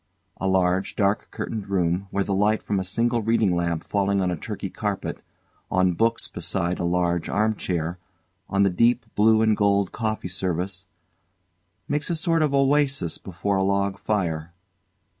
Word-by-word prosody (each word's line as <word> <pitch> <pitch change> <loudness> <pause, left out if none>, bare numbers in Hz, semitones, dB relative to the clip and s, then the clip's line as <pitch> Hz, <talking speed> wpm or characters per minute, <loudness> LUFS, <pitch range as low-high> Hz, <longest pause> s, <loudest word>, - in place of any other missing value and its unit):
A 95 - -2
large, 95 0 +1
dark 100 0 +1
curtained 105 -3 -5
room 90 0 0
where 100 +1 0
the 100 - -2
light 105 +3 +2
from 100 -2 0
a - - -1
single 115 +5 +1
reading 110 -4 +2
lamp 85 -2 -1
falling 100 -1 0
on 90 -2 0
Turkey - - -5
carpet, - - -3 0.5
on 95 -1 +2
books 115 +6 +1
beside 90 +1 -2
a - - -1
large 85 -1 0
armchair, 90 -5 -1 0.5
on 100 +1 +2
the 100 - +3
deep 115 +5 +2
blue 110 +1 +4
and 110 -1 +3
gold 100 -2 +2
coffee 110 -4 -2
service, 90 +1 -3 1.0
makes 145 +3 -1
a 170 - +1
sort 165 0 +1
of 150 -2 +2
oasis 140 - +2
before 95 +2 -2
a 95 - +2
log 100 0 0
fire. 85 -6 -2
100 Hz, 160 wpm, -24 LUFS, 90-110 Hz, 1.0 s, blue